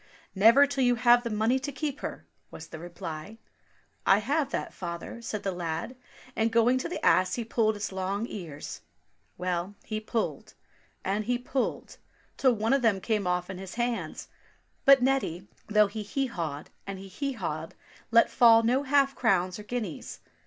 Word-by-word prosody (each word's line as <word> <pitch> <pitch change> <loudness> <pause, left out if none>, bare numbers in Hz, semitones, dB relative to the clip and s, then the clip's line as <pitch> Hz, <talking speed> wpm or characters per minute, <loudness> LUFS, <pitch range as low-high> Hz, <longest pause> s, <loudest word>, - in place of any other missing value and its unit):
" - - -27
Never 230 +8 +7
till 275 -1 -1
you 245 0 +4
have 240 0 +5
the 235 - -4
money 225 +4 +1
to 280 +2 -4
keep 290 +1 -4
her," - - -6 0.2
was - - -10
the 160 - -8
reply. 170 +3 -7 0.7
"I 195 - +5
have 275 +7 0
that, - - -3
father," 170 +6 -6
said 220 -3 -4
the 195 - 0
lad, 175 +6 -4 0.4
and 225 +1 +1
going 235 +3 +4
to 300 - -3
the 350 - -4
ass 185 0 +4
he 240 - -2
pulled 220 -1 +1
its 205 0 -4
long 190 +3 -2
ears; 165 -10 -7 0.6
well, 180 +2 -2
he 215 -1 -3
pulled, 220 +1 -3 0.5
and 205 +2 0
he 245 +2 +1
pulled, 250 +1 -3 0.4
till 260 -2 +3
one 225 +2 +1
of 275 - +3
them 220 -5 +3
came 210 -1 -1
off 180 0 0
in 190 -1 -7
his 190 -1 -8
hands; 240 0 -2 0.6
but 275 -2 +7
Neddy, 225 -9 0 0.2
though 210 0 +5
he 210 +2 -5
hee 270 +7 -1
hawed 160 - -5 0.2
and 195 -1 -4
he 195 +1 -9
hee 275 +9 -3
hawed 165 -7 -5 0.3
let 230 0 +6
fall 230 -1 +6
no 250 +4 +2
half 275 -1 +3
crowns 185 -7 +1
or - - -8
guineas. 215 -7 -5
220 Hz, 180 wpm, -28 LUFS, 185-245 Hz, 0.7 s, Never